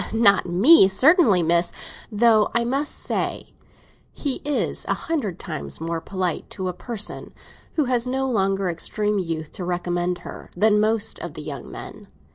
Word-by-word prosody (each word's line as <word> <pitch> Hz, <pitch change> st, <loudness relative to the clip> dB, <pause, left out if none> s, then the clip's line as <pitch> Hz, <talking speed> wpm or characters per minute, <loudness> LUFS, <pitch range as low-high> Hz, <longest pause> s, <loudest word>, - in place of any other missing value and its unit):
"Not 205 Hz, -4 st, +4 dB
me, 195 Hz, -, +7 dB
certainly, 225 Hz, -, +4 dB
miss; 170 Hz, +1 st, +2 dB, 0.4 s
though 220 Hz, 0 st, +3 dB
I 235 Hz, -, +2 dB
must 275 Hz, +5 st, -1 dB
say -, -, -3 dB, 0.6 s
he 280 Hz, -4 st, -3 dB
is 290 Hz, -1 st, 0 dB
a -, -, 0 dB
hundred 255 Hz, -, -3 dB
times 155 Hz, -6 st, -6 dB
more 165 Hz, 0 st, -3 dB
polite 185 Hz, -3 st, -3 dB
to 185 Hz, -, -3 dB
a -, -, -4 dB
person 210 Hz, +3 st, -5 dB, 0.4 s
who 305 Hz, -, +1 dB
has 245 Hz, -1 st, +1 dB
no 265 Hz, +1 st, -1 dB
longer 195 Hz, -5 st, 0 dB
extreme 210 Hz, +4 st, -1 dB
youth 165 Hz, -4 st, -4 dB
to 185 Hz, -, -7 dB
recommend 175 Hz, 0 st, -2 dB
her -, -, -9 dB
than 210 Hz, +2 st, +3 dB
most 215 Hz, 0 st, +1 dB
of -, -, -7 dB
the -, -, -7 dB
young -, -, -7 dB
men. -, -, -10 dB
200 Hz, 160 wpm, -22 LUFS, 175-240 Hz, 0.6 s, me